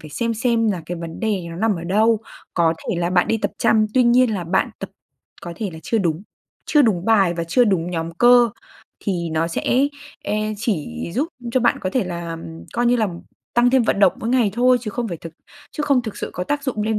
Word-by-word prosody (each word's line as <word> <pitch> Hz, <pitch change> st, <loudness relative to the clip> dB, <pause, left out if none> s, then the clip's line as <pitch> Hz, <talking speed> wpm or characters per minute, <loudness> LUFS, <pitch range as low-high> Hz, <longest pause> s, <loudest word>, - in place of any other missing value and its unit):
phải 155 Hz, -, -11 dB
xem 230 Hz, +4 st, -1 dB
xem 230 Hz, -1 st, +1 dB
là 180 Hz, -4 st, -3 dB
cái 175 Hz, -, -4 dB
vấn 165 Hz, -1 st, -7 dB
đề 210 Hz, -5 st, -1 dB
nó 165 Hz, -, -7 dB
nằm 215 Hz, 0 st, +1 dB
ở 170 Hz, -, -6 dB
đâu? 215 Hz, +4 st, +3 dB, 0.4 s
Có 165 Hz, -2 st, +3 dB
thể -, -, -3 dB
là 175 Hz, 0 st, 0 dB
bạn 180 Hz, -1 st, +2 dB
đi 225 Hz, -, +1 dB
tập 205 Hz, -1 st, -1 dB
chăm, 215 Hz, -1 st, +3 dB
tuy 255 Hz, -, +5 dB
nhiên 240 Hz, -1 st, +4 dB
là 180 Hz, -, -3 dB
bạn 190 Hz, +3 st, +1 dB
tập -, -, -7 dB, 0.5 s
có 175 Hz, -, -6 dB
thể 215 Hz, -4 st, -3 dB
là 160 Hz, -, -9 dB
chưa 225 Hz, +7 st, 0 dB
đúng, 170 Hz, -1 st, -1 dB, 0.4 s
chưa 295 Hz, -, +4 dB
đúng 195 Hz, -8 st, +1 dB
bài 195 Hz, -6 st, +3 dB
và 170 Hz, -, -3 dB
chưa 180 Hz, +10 st, +3 dB
đúng 180 Hz, -5 st, 0 dB
nhóm 165 Hz, -1 st, -3 dB
cơ 240 Hz, +4 st, +5 dB, 0.5 s
thì 170 Hz, -4 st, -2 dB
nó 160 Hz, +1 st, 0 dB
sẽ, 255 Hz, +10 st, +1 dB, 0.4 s
e 215 Hz, +1 st, -1 dB
chỉ 200 Hz, -8 st, -2 dB, 0.2 s
giúp 290 Hz, +8 st, -1 dB, 0.2 s
cho 255 Hz, -, +2 dB
bạn 235 Hz, -, +3 dB
có 185 Hz, -, -2 dB
thể 250 Hz, -3 st, 0 dB
là, 170 Hz, -1 st, -5 dB
ừm, 165 Hz, 0 st, -8 dB
coi 240 Hz, 0 st, 0 dB
như 245 Hz, +1 st, +4 dB
là 220 Hz, -3 st, +1 dB, 0.5 s
tăng 240 Hz, +1 st, +4 dB
thêm 260 Hz, -1 st, +4 dB
vận 210 Hz, -, 0 dB
động 195 Hz, -3 st, +5 dB
mỗi 225 Hz, -, -3 dB
ngày 245 Hz, -4 st, +3 dB
thôi 250 Hz, +1 st, +4 dB
chứ 215 Hz, -3 st, -5 dB
không 235 Hz, +3 st, -3 dB
phải 170 Hz, -, -4 dB
thực 165 Hz, 0 st, -10 dB, 0.4 s
chứ 300 Hz, -, -3 dB
không 280 Hz, -4 st, +2 dB
thực 220 Hz, -3 st, -6 dB
sự -, -, -5 dB
có 180 Hz, -, -4 dB
tác 290 Hz, +6 st, -2 dB
dụng 250 Hz, -6 st, -2 dB
lên 215 Hz, 0 st, 0 dB
210 Hz, 245 wpm, -21 LUFS, 175-240 Hz, 0.5 s, tuy